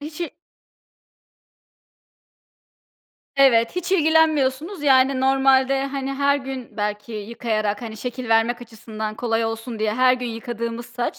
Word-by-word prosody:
Hiç 300 +2 -8
i 345 - -5 3.0
Evet, 260 0 +4
hiç 360 +1 -2
ilgilenmiyorsunuz, 315 0 +2
yani, 265 -1 +4
normalde, 270 0 +3
hani, 275 0 -4
her 280 +1 +2
gün 265 -2 -7
belki 210 +1 -3
yıkayarak, 215 -1 -2
hani, 220 -2 -7
şekil 250 +2 -5
vermek 230 +2 +2
açısından 220 -2 -7
kolay 225 0 -1
olsun 225 +1 -4
diye, 215 0 0
her 255 +1 +4
gün 250 -1 -5
yıkadığımız 235 0 -5
saç 245 0 -4
250 Hz, 125 wpm, -22 LUFS, 225-275 Hz, 3.0 s, Evet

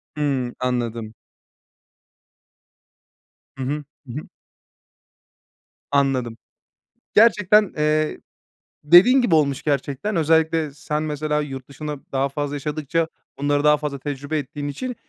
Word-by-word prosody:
Hıı, 135 -5 -1
anladım. 120 -3 -2 2.4
Hı 135 - -5
hı, 145 +3 -2 0.2
hı 120 - -7
hı. - - -15 1.6
Anladım. 130 -5 +1 0.8
Gerçekten, 210 -2 +5
eee, 155 0 +1 0.6
dediğin 195 - +7
gibi 185 -9 +3
olmuş 140 -3 +1
gerçekten. 145 +7 -1
Özellikle 160 -1 +2
sen, 150 +1 -3
mesela, 150 0 -1
yurt 135 -3 -7
dışında 150 0 -6
daha 135 +1 0
fazla 145 +1 -3
yaşadıkça 155 +3 -1 0.3
bunları 145 0 +1
daha 150 0 +5
fazla 145 -2 -4
tecrübe 145 +2 -4
ettiğin 145 +1 -5
için, 245 - -4
150 Hz, 105 wpm, -22 LUFS, 135-155 Hz, 2.4 s, dediğin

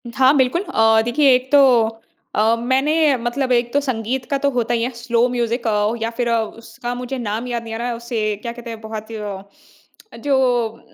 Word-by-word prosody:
हाँ 265 +2 +5
बिल्कुल, 260 +6 +2
अ, 225 - +3
देखिए 270 +3 +4
एक 255 +1 -3
तो 290 - +7 0.8
अ, 220 +2 +3
मैंने 270 +5 +2
मतलब 255 +2 -1
एक 240 -1 +2
तो 285 - +4
संगीत 250 -1 -2
का 280 - +2
तो 280 - +4
होता 240 -2 -1
ही 230 -1 0
है 245 - 0
स्लो 235 0 +1
म्यूज़िक 235 -1 -1
अ, 210 0 +1
या 225 - 0
फिर 245 -1 0
उसका 230 +2 -3
मुझे 250 +2 -5
नाम 230 0 -3
याद 240 -1 -3
नहीं 225 -1 -7
आ - - -3
रहा 240 +1 -3
है, 240 - -2
उसे 230 -3 -2
क्या 235 - -4
कहते 240 0 -9
हैं? 225 -1 -7
बहुत 220 -1 -7 1.2
जो 280 -2 +2 0.3
उम, 225 - -17
240 Hz, 205 wpm, -20 LUFS, 225-260 Hz, 1.2 s, तो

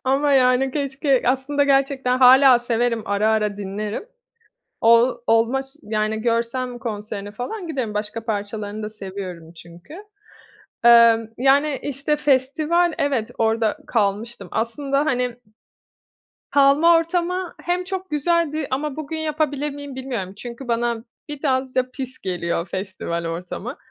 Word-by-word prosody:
ama, 280 +2 +2
yani, 260 0 +4
keşke 275 -1 0
aslında 270 +3 +1
gerçekten 270 -2 +2
hâlâ 260 0 +7
severim, 240 -1 0
ara 205 +2 +1
ara 210 -2 +1
dinlerim. 205 - -5 0.8
Ol 235 +2 +5
olma 230 +4 +3
ş 270 - -13 0.2
yani, 215 0 -1
görsem 240 +1 -1
konserini 210 -3 -5
falan 335 - -6
giderim. 255 -9 -3
Başka 210 +2 -4
parçalarını 210 0 -4
da 210 - -4
seviyorum 185 -5 -8
çünkü. 170 - -14 0.9
Emm, 230 -1 +6
yani, 275 +2 +3
işte, 285 +2 -1
festival, 305 +5 +2
evet, 265 -6 -1
orada 225 -1 +1
kalmıştım. 210 -2 -1
Aslında, 275 +5 -1
hani 250 -4 -1 1.1
kalma 285 +4 +5
ortamı 350 +2 -1
hem 355 +1 -1
çok 375 -1 -5
güzeldi 310 -1 0
ama 280 +2 -2
bugün 315 +1 -5
yapabilir 300 -2 -1
miyim, 285 -1 -8
bilmiyorum. 245 -8 -5
Çünkü 240 +2 -8
bana 235 0 -1 0.2
biraz 265 -3 -2
da 255 0 +1
pis 260 0 -7
geliyor 175 -2 -3
festival 185 -3 -4
ortamı. 180 - -5
250 Hz, 125 wpm, -22 LUFS, 215-285 Hz, 1.1 s, hâlâ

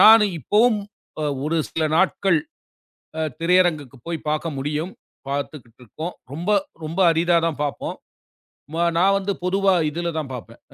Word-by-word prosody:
நானும் 215 -3 +8
இப்போவும் 215 - +3 0.7
ஒரு 160 +2 0
சில 160 - 0
நாட்கள் 190 -1 +3 0.8
அ - - +1 0.2
திரையரங்குக்கு 165 -6 +2
போய்ப் 165 -2 -4
பார்க்க 155 +2 -1
முடியும். 150 +6 -2 0.4
பார்த்துக்கிட்டு 140 -4 -5
இருக்கோம். 160 +10 -6 0.2
ரொம்ப 170 +7 -3 0.4
ரொம்ப 165 +5 -4
அரிதாதான் 165 -2 +2
பார்ப்போம். 145 - -3 0.8
மா 170 - 0 0.2
நான் 195 +2 +5
வந்து 200 0 -1
பொதுவா 195 +1 +3 0.2
இதுல 170 +3 -2
தான் 140 -4 -5
பார்ப்பேன். 115 -1 -9
165 Hz, 130 wpm, -23 LUFS, 150-190 Hz, 0.8 s, நானும்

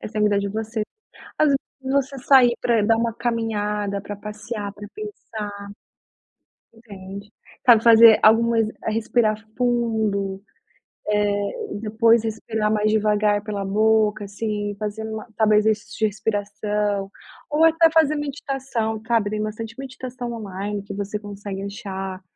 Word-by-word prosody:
Essa 215 0 -6
é - - +1
vida 205 -1 +3
de 200 0 -2
você. 220 +1 -3 0.6
Às 310 - +4
vezes, 275 -1 +3 0.2
você 275 +1 0
sair 255 -3 +6
pra 230 -3 +2
dar 225 +1 +3
uma 230 -1 0
caminhada, 210 -4 -2
pra 205 0 -7
passear, 210 0 -6
pra 205 0 -10
pensar. 220 - -7 1.1
Entende. 200 -2 -11 0.4
Sabe, 230 -2 +7
fazer 230 -1 +8
algumas 225 0 +4 0.2
respirar 220 0 +1 0.2
fundo, 220 -5 0 1.0
eh, 425 - -4
depois 225 +1 +3
respirar 220 -1 -2
mais 215 0 +2
devagar 210 -1 +2
pela 205 -2 -4
boca, 215 +1 +2
assim, 205 0 -3
fazendo 220 +1 -4
uma 215 +1 -6
talvez 215 -1 +3
exercícios 220 0 -1
de 220 - +2
respiração. 205 -1 -2 0.4
Ou 300 +2 +2
até 325 0 +5
fazer 310 -2 +4
meditação, 270 -6 -3
cabe. 225 -3 0
Tem 215 0 -2
bastante 220 +2 -5
meditação 255 -2 -6
online 205 -2 -5
que 200 0 -8
você 205 +1 -3
consegue 200 -1 -7
achar 195 -2 -6
215 Hz, 135 wpm, -23 LUFS, 205-230 Hz, 1.1 s, fazer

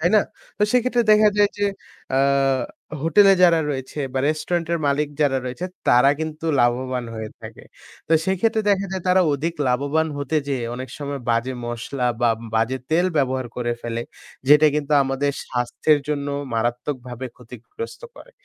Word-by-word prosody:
তাই 170 - +3
না? - - +6 0.4
তো - - 0
সেক্ষেত্রে 250 -1 +2
দেখা 215 0 +6
যায় 205 0 +5
যে, 205 - +1 0.5
অ্যা 130 - +1 0.8
হোটেলে 195 +5 +6
যারা 170 -2 +6
রয়েছে 130 +1 -5
বা 135 - -1
restaurant 165 +2 -1
এর 170 - +1
মালিক 140 +1 +1
যারা 140 -3 +3
রয়েছে 130 +8 -5 0.2
তারা 125 +3 +6
কিন্তু 160 +1 -4
লাভবান 125 +1 0
হয়ে 110 -1 -6
থাকে। - - -11 0.4
তো - - +1
সেক্ষেত্রে 220 +4 +1
দেখা 200 0 +1
যায় 190 -2 -3
তারা 185 +1 +5
অধিক 160 +4 -2
লাভবান 145 +5 +1
হতে 145 +2 -1
যেয়ে 130 -4 -1
অনেক 130 +1 -6
সময় 140 -1 -4
বাজে 115 +3 0
মসলা 120 +2 -3
বা 120 -1 +4 0.2
বাজে 115 +4 +1
তেল 170 +3 +3
ব্যবহার 130 -2 0
করে 120 -1 -1
ফেলে, 115 0 -3 0.5
যেটা 150 +1 +7
কিন্তু 150 0 -1
আমাদের 135 +1 -1 0.2
স্বাস্থ্যের 125 +5 +1
জন্য 145 -1 -2 0.3
মারাত্মকভাবে 125 +2 -3
ক্ষতিগ্রস্ত 125 - -9 0.2
করে। - - -14
140 Hz, 160 wpm, -22 LUFS, 125-165 Hz, 0.8 s, যেটা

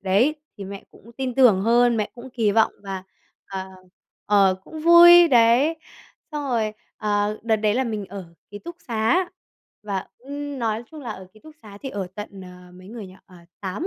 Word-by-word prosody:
đấy, 200 +10 +2 0.2
thì 200 - -7
mẹ 195 0 -9
cũng 235 - -18
tin 260 -2 -3
tưởng 240 -8 +5
hơn, 235 +2 +3
mẹ 210 - -2
cũng 250 +2 -11
kỳ 225 -4 +1
vọng 220 +1 +3
và, 195 -1 -6 0.4
ờ, 190 -1 -6 0.6
ờ, 200 -2 +4
cũng 315 -1 -9
vui 340 +1 +8
đấy. 245 +6 +4 0.6
Xong 295 -2 -4
rồi, 225 -4 0 0.2
ờ, 210 0 -1
đợt 225 -1 +2
đấy 210 -1 +1
là 260 +2 +1
mình 215 -4 -4
ở 195 0 -8 0.3
ký 205 - -8
túc 340 +8 -10
xá 240 +12 +1 0.5
và, 200 -2 -4
ưm, 285 +2 -7
nói 225 -2 -1
chung 310 - -10
là 245 -5 -6
ở 190 -3 -8
ký 215 - -20
túc 310 +4 -15
xá 205 -2 -12
thì 270 - -4
ở 200 -5 -4
tận, 205 -2 -8
ờ, 180 0 -14
mấy 185 +1 -14
người 220 -2 -8
nhỉ? 185 - -14
À, 175 -2 -18
8 200 - -4
220 Hz, 200 wpm, -23 LUFS, 200-260 Hz, 0.6 s, vui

